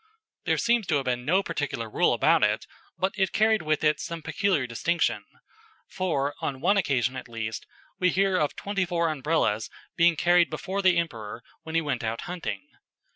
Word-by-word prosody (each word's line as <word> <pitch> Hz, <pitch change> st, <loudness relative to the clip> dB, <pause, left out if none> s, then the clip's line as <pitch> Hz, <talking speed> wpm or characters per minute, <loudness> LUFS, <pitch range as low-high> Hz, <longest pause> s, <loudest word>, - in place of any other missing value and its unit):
There -, -, +2 dB
seems 235 Hz, -4 st, +2 dB
to 155 Hz, -, +2 dB
have 140 Hz, -2 st, 0 dB
been 125 Hz, -1 st, -1 dB
no 185 Hz, +7 st, +3 dB
particular 145 Hz, -9 st, -3 dB
rule 110 Hz, -, +2 dB
about -, -, +3 dB
it, -, -, +1 dB, 0.3 s
but 190 Hz, +1 st, 0 dB
it 190 Hz, -, +2 dB
carried 220 Hz, -1 st, +3 dB
with 155 Hz, 0 st, 0 dB
it 150 Hz, -1 st, +3 dB
some 165 Hz, -1 st, -6 dB
peculiar 185 Hz, -8 st, 0 dB
distinction; 160 Hz, +8 st, 0 dB, 0.6 s
for, 150 Hz, -7 st, -1 dB
on 135 Hz, -2 st, -3 dB
one 185 Hz, +8 st, +3 dB
occasion 135 Hz, -, +1 dB
at -, -, -7 dB
least, 115 Hz, -1 st, -5 dB, 0.3 s
we 180 Hz, -, +3 dB
hear 195 Hz, +1 st, +2 dB
of 150 Hz, -5 st, 0 dB
twenty 200 Hz, -1 st, -2 dB
four 170 Hz, -2 st, 0 dB
Umbrellas 140 Hz, -7 st, 0 dB, 0.3 s
being 170 Hz, 0 st, +4 dB
carried 175 Hz, +2 st, +4 dB
before 195 Hz, +1 st, -3 dB
the 185 Hz, -3 st, +4 dB
Emperor 115 Hz, -9 st, -3 dB, 0.2 s
when 160 Hz, 0 st, -7 dB
he 165 Hz, -, +3 dB
went 140 Hz, -6 st, -2 dB
out 115 Hz, +1 st, -2 dB
hunting. 180 Hz, -, -5 dB
165 Hz, 180 wpm, -26 LUFS, 135-185 Hz, 0.6 s, being